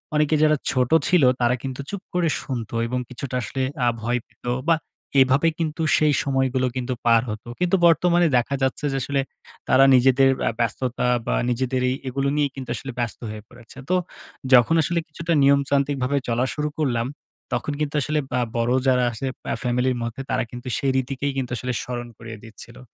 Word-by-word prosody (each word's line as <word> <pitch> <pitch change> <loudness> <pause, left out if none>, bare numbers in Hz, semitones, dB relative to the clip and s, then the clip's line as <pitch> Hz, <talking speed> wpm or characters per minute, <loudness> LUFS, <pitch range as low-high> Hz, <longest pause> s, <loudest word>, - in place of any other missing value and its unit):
অনেকে 150 +1 +3
যারা 155 0 +4
ছোট 125 -2 +1 0.2
ছিল, 180 -5 +4 0.2
তারা 120 +1 +3
কিন্তু 135 0 -4
চুপ 200 -2 -5
করে 175 -2 +1
শুনতো। 120 -5 -5
এবং 125 +1 -2
কিছুটা 125 +1 -6
আসলে 130 +5 -4 0.2
আ - - +3
ভয় 120 +2 0
পেতো, 120 - -6 0.2
বা 165 - +6 0.5
এভাবে 130 +5 +3
কিন্তু 160 0 -2 0.2
সেই 150 -1 +3
সময়গুলো 130 -2 +1
কিন্তু 125 0 -2
পার 115 -1 +5
হতো। 105 +2 -6
কিন্তু 180 +1 +2
বর্তমানে 170 +1 +4
দেখা 140 +3 0
যাচ্ছে 130 +3 -1
যে, - - 0
আসলে 140 +2 0 0.5
তারা 135 +1 +6
নিজেদের 135 +1 +5 0.2
আ - - +2
ব্যস্ততা, 125 +2 -1 0.2
বা - - 0
নিজেদেরই 125 +1 0
এগুলো 135 +2 -1
নিয়েই 145 -2 +1
কিন্তু 130 -2 -7
আসলে 135 +5 -6
ব্যস্ত 120 -2 -3
হয়ে 105 -1 -7
পড়েছে। 120 0 -16
তো 185 - +3 0.6
যখন 125 +6 +6
আসলে 170 +2 0
কিছুটা 165 +2 -3
নিয়মতান্ত্রিকভাবে 140 -1 +2
চলা 120 +1 +1
শুরু 150 0 -2
করলাম। 120 -6 0 0.5
তখন - - -1
কিন্তু 150 -1 -2
আসলে 150 +2 0
বা 125 - +1 0.2
বড়ো 120 +2 +1
যারা 125 -1 +4
আছে 120 +4 -5 0.3
আ - - -1
ফ্যামিলির 125 +1 +1
মধ্যে 115 +3 -5
তারা - - +1
কিন্তু 125 +1 -8
সেই 135 - +1
রীতিকেই 135 +2 -2
কিন্তু 130 -2 -3
আসলে 125 +1 -3
স্মরণ 120 -1 -5
করিয়ে 115 -1 -9
দিচ্ছিলো। 115 +1 -12
130 Hz, 180 wpm, -23 LUFS, 120-145 Hz, 0.6 s, বা